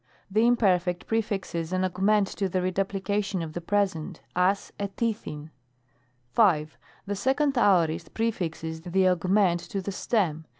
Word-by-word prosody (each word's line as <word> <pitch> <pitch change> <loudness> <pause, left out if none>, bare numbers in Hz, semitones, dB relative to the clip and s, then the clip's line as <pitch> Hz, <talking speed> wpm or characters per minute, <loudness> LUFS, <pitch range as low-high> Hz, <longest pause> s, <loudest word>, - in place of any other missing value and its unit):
The 220 +4 +4
Imperfect 180 -7 +2
prefixes 195 -7 -2
an 185 0 +1
augment 195 +3 +2
to 195 -2 -2
the 185 - -1
redu 185 +1 0
plication 195 -1 -2
of 155 -1 -7
the 175 - -4
Present; 190 -3 -1 0.2
as, 185 +3 +1
s 200 0 -2
ri'&^v. 160 -10 -3 0.8
5. 155 -9 +3 0.3
The 205 - -2
2d 270 +7 +1
Aorist 170 -7 +2
prefixes 165 -8 -2
the 185 +2 +2
augment 180 0 +2
to 200 - -2
the 195 +1 -4
stem. 180 -6 -1
190 Hz, 140 wpm, -27 LUFS, 170-205 Hz, 0.8 s, The